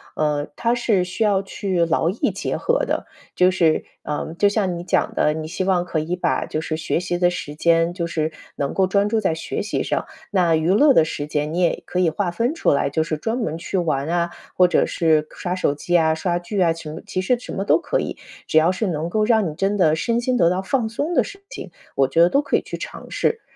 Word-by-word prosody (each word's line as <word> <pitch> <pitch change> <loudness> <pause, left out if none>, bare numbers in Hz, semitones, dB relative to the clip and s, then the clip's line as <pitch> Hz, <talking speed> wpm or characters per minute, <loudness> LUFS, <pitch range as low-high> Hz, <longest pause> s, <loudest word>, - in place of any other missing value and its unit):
嗯， 150 -1 0
它 235 +1 +1
是 220 -6 +1
需 185 +5 -2
要 200 -2 +3
去 190 -3 -1
劳 165 0 +1
逸 195 - 0
结 - - -3
合 - - +1
的。 - - -2 0.3
就 180 0 +4
是， 170 -4 +2 0.2
呃， 150 +2 -4
就 205 - +4
像 200 -4 0
你 170 - -6
讲 - - 0
的， 150 - +2
你 155 0 -5
希 180 +3 -3
望 185 -2 +1
可 165 -3 -1
以 165 +3 -2
把 180 - 0
就 155 - -3
是 155 - -3
学 160 +1 -1
习 175 -1 -2
的 175 0 +3
时 150 -4 -6
间 165 +1 +2
就 170 -2 -3
是 160 -1 -1 0.2
能 140 - -2
够 190 - +3
专 200 +2 +2
注 220 +1 +1
在 190 -5 +1
学 160 - -4
习 - - -2
上， - - -1 0.3
那 175 -4 +3
娱 160 +2 0
乐 280 +5 +6
的 160 - +5
时 145 -2 -4
间 150 +1 -2
你 175 - -1
也 175 - +1
可 180 - -2
以 180 - +3
划 175 +2 -2
分 235 - 0
出 330 - +1
来， 140 0 +1
就 150 +3 0
是 155 -1 -3
专 225 +9 -2
门 160 -10 -2
去 170 +3 -3
玩 155 -5 0
啊， 170 0 +1 0.3
或 180 -1 +5
者 - - +2
是 155 -2 +2
刷 180 0 -3
手 145 -6 +1
机 175 +4 +1
啊、 160 -1 +3
刷 175 +2 -1
剧 185 +4 -4
啊， 170 -3 +3
晴 160 -1 -8
其 185 - -2
实 240 +6 +1
什 - - -8
么 195 - -2
都 205 - +3
可 - - -1
以。 - - -4 0.3
只 - - +2
要 160 +3 +5
是 195 +3 -2
能 160 -1 -2
够 215 +4 +1
让 220 -6 +3
你 - - -6
真 195 +3 0
的 155 -5 +4
身 230 +8 0
心 255 +1 0
得 170 -4 +4
到 185 +1 0
放 230 +3 0
松 290 +9 -2
的 - - +4
事 395 0 -11
情， - - -8 0.2
我 135 -1 +3
觉 150 +5 +2
得 170 - +6
都 280 - +3
可 285 - +1
以 - - -2
去 - - -7
尝 - - -8
试。 455 -1 0
175 Hz, 275 characters per minute, -22 LUFS, 160-200 Hz, 0.3 s, 乐